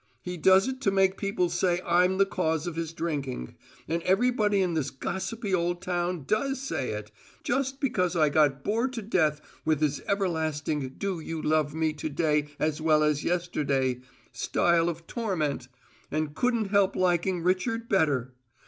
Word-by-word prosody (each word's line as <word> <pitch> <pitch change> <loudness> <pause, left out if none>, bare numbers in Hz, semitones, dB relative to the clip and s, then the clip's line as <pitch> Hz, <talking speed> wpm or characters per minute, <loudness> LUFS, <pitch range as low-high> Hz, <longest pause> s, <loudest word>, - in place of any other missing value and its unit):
He 180 0 -4
does 190 +5 +5
it 265 0 -4
to 205 - +2
make 195 -1 +3
people 195 -3 0
say 175 0 +1
I'm 180 +2 +3
the 195 - +5
cause 160 -4 -1
of 175 -2 -4
his 165 -1 -3
drinking; 140 - -4 0.3
and 165 +2 -1
everybody 210 +1 +2
in 180 -3 +1
this 150 -4 -1
gossipy 190 - -4
old 175 0 +1
town 175 -2 -2
does 270 - 0
say 260 - -3
it 105 0 -6 0.3
just 270 0 -1
because 185 - 0
I 155 -3 +4
got 145 -2 +2
bored 230 +5 0
to 230 -3 -4
death 155 -7 +1 0.2
with 155 -2 +1
his 150 -2 0
everlasting 155 -7 -1
do 195 -3 -2
you 160 0 -5
love 155 -1 +1
me 160 -1 +1
to 150 +1 -4
day 150 -1 +1
as 155 0 -1
well 155 -1 +4
as 150 -1 +1
yesterday 140 -7 0 0.3
style 170 -1 +2
of 165 0 -6
torment, 160 - -2 0.4
and 155 0 -2
couldn't 235 +1 0
help 200 -2 +3
liking 180 -1 +1
Richard 225 +6 0
better. 145 - +1
175 Hz, 165 wpm, -27 LUFS, 155-195 Hz, 0.4 s, does